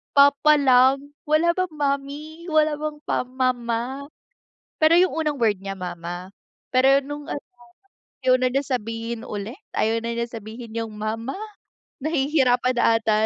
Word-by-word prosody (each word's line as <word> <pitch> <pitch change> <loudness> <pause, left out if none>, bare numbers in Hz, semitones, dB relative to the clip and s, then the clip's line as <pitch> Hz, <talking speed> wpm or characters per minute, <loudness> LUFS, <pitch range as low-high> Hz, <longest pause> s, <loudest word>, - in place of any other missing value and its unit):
papa 285 +2 +6
lang, 270 +2 +4
wala 320 +3 +2
bang 370 -2 -1
mommy? 290 +2 -3
Wala 310 -1 +3
bang 300 0 -5
pa - - +1
mama? 255 +1 -2 0.7
Pero 315 +2 +6
'yung 370 - +3
unang 295 -4 -1
word 215 -3 +3
niya 195 - -3
mama, 175 0 -6 0.4
pero 270 +2 +5
nung 290 +1 -7
ano, 290 - -3 0.8
ayaw 255 0 +4
na 255 - +2
niya 270 +3 0
sabihin 230 -2 -4
ulit, 210 - -6 0.2
ayaw 225 +1 +1
na 230 0 -4
niya 235 - -1
sabihin 225 +1 -8
yung 225 -2 -4
mama, 220 +4 -3 0.6
nahihirapan 265 -4 +1
ata 220 -2 +3
255 Hz, 140 wpm, -23 LUFS, 230-290 Hz, 0.8 s, papa